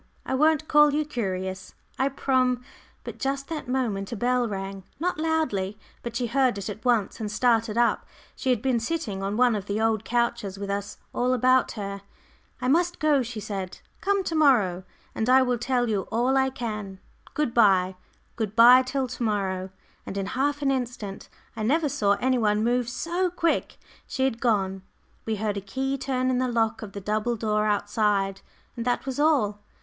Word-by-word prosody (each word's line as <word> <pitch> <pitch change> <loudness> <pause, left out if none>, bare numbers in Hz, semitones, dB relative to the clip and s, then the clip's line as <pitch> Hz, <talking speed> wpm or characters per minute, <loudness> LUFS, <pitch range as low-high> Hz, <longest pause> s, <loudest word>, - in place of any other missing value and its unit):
I - - -2
won't 310 +2 +3
call 295 -1 +5
you 305 0 +1
curious, 190 -9 -4 0.2
I 265 +1 +2
prom 255 -2 +1 0.2
" - - -31
But - - -8
just 275 0 -2
that 315 -5 -5
moment 235 -6 -1
a - - -2
bell 245 +2 +1
rang 195 -1 -5 0.2
not 350 -1 -1
loudly, 255 -12 0 0.2
but 235 -1 -6
she 245 +1 0
heard 255 -2 +2
it 200 +1 -5
at 210 +2 -10
once, 240 -5 +1
and 215 -2 -3
started 230 -1 +2
up. 235 0 +2 0.3
She 260 - -3
had 245 -4 +1
been 260 -3 +2
sitting 230 -7 -3
on 200 +2 -2
one 250 -1 +4
of 205 -2 -4
the 205 +1 -1
old 220 -1 +1
couches, 235 -4 -1
with 200 0 -4
us 200 0 -4 0.2
all 250 +1 +1
about 255 +1 +3
her. 200 -2 -5 0.6
"I 250 - -2
must 345 +5 +2
go," 300 -3 +3
she 235 -2 -5
said. 195 -3 -5 0.2
"Come 400 -1 +1
to 335 - -3
morrow 215 - +3 0.3
and 220 +2 -1
I 260 +1 +6
will 250 -2 0
tell 245 0 0
you 205 -4 -1
all 245 +4 +2
I 265 0 +3
can. 215 -7 -5 0.4
Good 295 -6 0
bye; 190 -5 +4 0.4
good 215 -3 -3
bye 245 +2 +8
till 260 +1 -2
to 250 0 -8
morrow," 190 -4 -1 0.4
and 195 - -5
in 195 - -1
half 285 +7 -1
an 275 - +3
instant 240 -6 -4 0.3
I - - -5
never 295 +8 +2
saw 205 -7 +2
any 255 +5 +1
one 210 -1 +2
move 245 +1 +1
so 345 +8 -1
quick 335 -1 -1 0.3
she 265 - -2
had 250 -3 0
gone. 195 -5 +1 0.5
We 220 - 0
heard 210 -1 -2
a - - -3
key 265 +8 -2
turn 260 -1 -1
in 250 - +1
the 255 - +1
lock 225 -2 0
of 205 -3 -8
the 200 - -6
double 215 +4 -1
door 215 -1 0
outside, 200 -2 0 0.3
and 235 - -4
that 245 +1 0
was 265 0 -4
all! 260 -10 +2
235 Hz, 195 wpm, -26 LUFS, 205-265 Hz, 0.6 s, bye